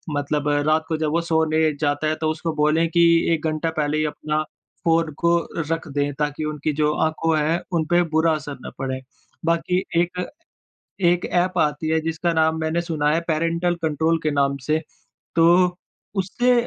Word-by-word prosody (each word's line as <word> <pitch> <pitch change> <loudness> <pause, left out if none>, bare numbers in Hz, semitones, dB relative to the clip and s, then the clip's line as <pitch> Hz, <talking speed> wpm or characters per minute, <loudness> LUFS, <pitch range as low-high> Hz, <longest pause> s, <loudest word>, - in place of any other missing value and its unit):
मतलब 145 +1 -1 0.2
रात 155 +1 +2
को 160 -2 -1
जब 155 -1 -1
वो 170 +1 +1
सोने 160 -1 +2
जाता 145 +1 0
है 155 - +1
तो 155 - +1
उसको 160 +1 -3
बोलें 155 +2 +2
कि 170 +1 +3 0.3
1 160 0 -2
घंटा 155 +1 -1
पहले 150 0 0
ही 155 - +1
अपना 155 0 -2 0.4
फ़ोन 165 -1 +2
को 170 0 +3 0.3
रख 165 -1 -2
दें 145 0 -1
ताकि 150 +1 -1
उनकी 150 0 -2
जो 150 0 +1
आँखों 160 0 +1
है 160 +3 +1
उनपे 170 +1 +2
बुरा 160 +1 +3
असर 145 -1 -6
ना - - -7
पड़े। 130 0 -3 0.5
बाकी 180 +3 +1 0.2
एक 180 +1 -2 0.8
एक 175 +1 +3
ऐप 180 0 0
आती 150 +1 0
है 160 0 +2
जिसका 165 +2 -1
नाम 160 0 +2
मैंने 160 +2 0
सुना 155 -4 -1
है 165 +2 +2
पैरेंटल 165 +2 +1
कंट्रोल 160 +1 +1
के 155 - +1
नाम 140 -1 +1
से। 155 +1 +2 0.6
तो 175 +2 +4 0.4
उससे 245 +7 +1
160 Hz, 175 wpm, -22 LUFS, 150-165 Hz, 0.8 s, तो